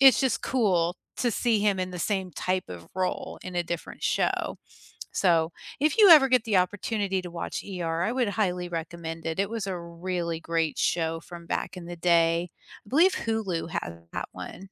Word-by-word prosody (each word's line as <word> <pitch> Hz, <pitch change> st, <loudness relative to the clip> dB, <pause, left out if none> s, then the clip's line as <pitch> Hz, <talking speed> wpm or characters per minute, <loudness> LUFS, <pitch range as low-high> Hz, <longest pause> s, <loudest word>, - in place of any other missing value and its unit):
it's 270 Hz, -1 st, +8 dB
just 265 Hz, -5 st, +1 dB
cool 180 Hz, -8 st, +2 dB, 0.2 s
to 245 Hz, -, +2 dB
see 230 Hz, 0 st, +2 dB
him 205 Hz, -2 st, +2 dB
in 185 Hz, 0 st, -2 dB
the 180 Hz, -, -6 dB
same 190 Hz, +1 st, -1 dB
type 185 Hz, +4 st, -1 dB
of 85 Hz, -2 st, -9 dB
role 185 Hz, 0 st, -2 dB
in 185 Hz, -, -7 dB
a 175 Hz, -, +2 dB
different 170 Hz, 0 st, -6 dB
show, -, -, 0 dB, 0.6 s
so, 165 Hz, -3 st, +3 dB, 0.3 s
if 300 Hz, +2 st, +2 dB
you 410 Hz, -4 st, +9 dB
ever 300 Hz, -5 st, +10 dB
get 255 Hz, -3 st, +4 dB
the 215 Hz, -5 st, +2 dB
opportunity 195 Hz, +1 st, 0 dB
to 180 Hz, -, -7 dB
watch 170 Hz, -, -4 dB
ER 170 Hz, -4 st, -2 dB
I 220 Hz, -, +1 dB
would 250 Hz, -2 st, +1 dB
highly 180 Hz, -4 st, 0 dB
recommend 165 Hz, -1 st, -5 dB
it. 165 Hz, +2 st, -2 dB
It 200 Hz, -, +2 dB
was 225 Hz, -3 st, -3 dB
a 190 Hz, -2 st, -2 dB
really 170 Hz, 0 st, -3 dB
great 165 Hz, -1 st, -1 dB
show 165 Hz, -1 st, +1 dB
from 170 Hz, -1 st, -10 dB
back -, -, -3 dB
in 175 Hz, -, -8 dB
the 175 Hz, 0 st, -6 dB
day. 170 Hz, 0 st, +3 dB, 0.4 s
I -, -, -16 dB
believe 340 Hz, -, +5 dB
Hulu 210 Hz, -8 st, -2 dB
has 85 Hz, -, -3 dB, 0.2 s
that -, -, -3 dB
one. -, -, -8 dB
180 Hz, 195 wpm, -27 LUFS, 170-210 Hz, 0.6 s, ever